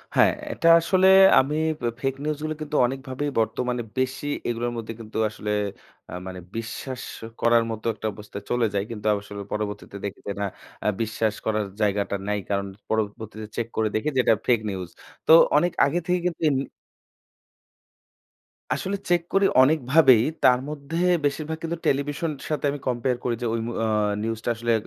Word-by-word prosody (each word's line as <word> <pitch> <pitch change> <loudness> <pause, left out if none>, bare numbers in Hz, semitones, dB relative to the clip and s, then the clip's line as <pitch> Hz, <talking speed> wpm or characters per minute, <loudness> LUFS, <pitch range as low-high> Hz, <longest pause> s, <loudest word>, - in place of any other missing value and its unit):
হ্যাঁ, - - +6 0.2
এটা 170 - 0
আসলে 185 +2 +3 0.3
আমি 140 +3 +1 0.3
বে 120 - 0
ফেক 135 0 0
নিউজগুলো 155 +1 -2
কিন্তু 150 0 -4
অনেকভাবেই 135 +2 -3
বর্তমানে 120 +2 0 0.2
বেশি 130 +2 -1 0.2
এগুলোর 120 0 -1
মধ্যে 115 0 -5
কিন্তু 110 -1 -7
আসলে 105 0 -5 0.6
অ্যা - - -7
মানে 95 -1 -6 0.2
বিশ্বাস 125 +3 -5 0.4
করার 115 0 +4
মতো 110 -1 -6
একটা 110 - -4
অবস্থায় 105 0 -9
চলে 120 -1 +2
যাই। 100 -1 0
কিন্তু 110 -2 -7
আসলে 100 0 -3
পরবর্তীতে 105 -1 -4
দেখি 100 - -5
যে - - -1
না - - +1 0.4
অ্যা - - +1
বিশ্বাস 110 -1 0
করার 110 -1 0 0.2
জায়গাটা 100 -1 +1
নাই। 105 0 0
কারণ 100 -1 0 0.2
পরবর্তীতে 110 0 -3
চেক 115 - -2
করে 110 -1 +2
দেখি 110 +8 0
যে - - +3
এটা - - +5
ফেক 120 -2 +4
নিউজ। 95 -3 -5 0.4
তো - - +5 0.3
অনেক 175 +4 +3
আগে 160 +5 0
থেকেই 180 -1 +1
কিন্তু 175 - -5
এম 140 - +1 2.2
আসলে 200 +1 -2
চেক 175 -1 +4
করি 195 0 +4 0.2
অনেকভাবেই। 135 -3 +5 0.2
তার 125 -1 +6
মধ্যে 150 +2 -5 0.3
বেশিরভাগ 155 +2 -1
কিন্তু 165 +1 -2
টেলিভিশনের 145 +1 -1
সাথে 150 -2 -1
আমি 145 - -5
কম্পেয়ার 125 0 0
করি 120 -2 0
যে - - -2
ওই 115 - 0
অম - - -4
অ্যা 115 - +1 0.4
নিউজটা 115 +1 -2
আসলে 115 +1 0
120 Hz, 165 wpm, -25 LUFS, 110-145 Hz, 2.2 s, হ্যাঁ